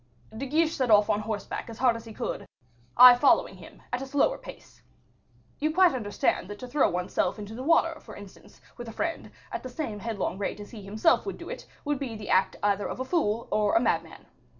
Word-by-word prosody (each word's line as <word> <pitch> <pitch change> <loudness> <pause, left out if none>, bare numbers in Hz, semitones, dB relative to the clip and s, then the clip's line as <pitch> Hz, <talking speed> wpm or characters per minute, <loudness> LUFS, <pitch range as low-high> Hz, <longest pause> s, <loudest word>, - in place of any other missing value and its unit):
"De 270 +5 -4
Guiche 315 +3 +1
set 255 -2 0
off 210 -1 +5
on 205 - +1
horseback 215 +1 -5
as 225 - -9
hard 250 -2 +3
as 230 0 -8
he 225 - -10
could, - - -5 0.5
I 250 0 +11
following 250 +3 +3
him, - - -14
at 250 - -1
a 270 - -5
slower 285 - +1
pace. - - -13 0.8
You 310 +1 +1
quite 360 0 +5
understand 205 -6 -1
that 205 - -7
to 250 - -8
throw 270 +3 +2
one's 180 +1 -4
self - - 0
into 210 0 -8
the 240 - -6
water, 330 +2 +2
for 215 - -12
instance, 200 -2 -14 0.2
with 240 -1 -8
a - - -9
friend, 330 +6 -3 0.2
at - - -4
the 255 - -7
same 245 -6 -5
headlong 205 -3 -3
rate 200 - -3
as 205 - -10
he 220 - -9
himself 215 - +1
would 390 - -4
do - - -9
it, - - -8 0.2
would 290 -2 -1
be 255 -5 -4
the 210 -2 -6
act 190 0 +3
either 205 0 +1
of - - -6
a 260 - -2
fool 235 -8 0
or 210 -1 +2
a - - +6
madman. 250 - -2
230 Hz, 230 wpm, -27 LUFS, 210-275 Hz, 0.8 s, I